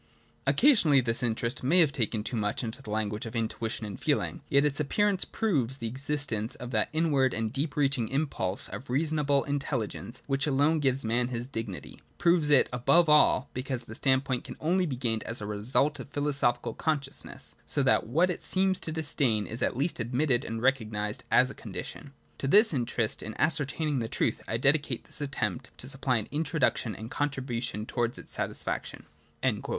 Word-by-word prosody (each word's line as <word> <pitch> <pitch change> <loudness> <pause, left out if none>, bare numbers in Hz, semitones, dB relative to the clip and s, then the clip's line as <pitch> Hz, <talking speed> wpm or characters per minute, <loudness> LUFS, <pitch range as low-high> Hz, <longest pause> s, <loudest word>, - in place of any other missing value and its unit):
Occasionally 175 - +5
this 115 -2 -1
interest 120 +3 -1
may 165 +8 +5
have 160 - +5
OF - - -12
THE - - -5
ENCYCLOPAEDIA. - - -7
xvii 115 - +5
taken 110 -2 -4
too 120 - -4
much 105 -2 -1
to 120 +2 -5
the 120 - -9
language 105 +1 -2
of 115 - -8
intuition 115 0 -2
and 100 -2 -7
feel - - +2
ing; - - -5
yet 140 +1 +4
its 145 0 0
appearance 195 +6 +1
proves 135 - 0
the 115 - -6
existence 130 -2 -2
of 125 0 -8
that 110 -3 +1
inward 145 -5 +2
and 115 0 -2
deeper 145 +2 -1
reaching 135 -5 +2
impulse 135 -9 -1
of 130 - -8
reasonable 145 0 +1
in 145 0 -1
telligence 125 -2 -4
which 135 +1 0
alone 145 +3 +3
gives 135 -3 +1
man 120 +2 +1
his 120 -1 -4
dignity, 115 -7 -6
— - - -36
proves 170 -3 +3
it 145 -3 +5
above 160 +7 +4
all, 150 -2 +5
because 130 -1 -3
that 110 - -10
standpoint 130 0 +1
can - - -9
only 180 +3 +1
be 135 - -3
gained 115 -3 -1
as 115 - -3
a 105 - -5
result 115 +8 0
of - - -8
philosophical 140 -4 0
consciousness; 145 -4 -3
so - - +1
that - - +3
what 165 +10 +2
it - - -5
seems 190 0 +3
to 160 - -4
disdain 140 -9 0
is 115 - -5
at - - 0
least 145 +3 -1
admitted 125 +2 +1
and 115 +1 -5
recognised 110 -5 0
as 130 +2 +4
a - - -8
condition. 115 +6 -8 0.3
To 135 - -2
this 210 - +6
interest 120 -4 -1
in 110 - -6
ascertaining 150 -1 +1
the 115 - -2
truth - - -1
I 115 - 0
dedicate 135 -1 +2
this - - -3
attempt 105 -10 -2
to 130 - -8
supply 135 -2 0
an 110 - -3
introduction 150 - 0
and 110 - -8
a - - -8
contribution 125 -6 -2
towards 120 0 -1
its - - -9
satisfaction.' - - -3
130 Hz, 195 wpm, -29 LUFS, 115-145 Hz, 0.3 s, this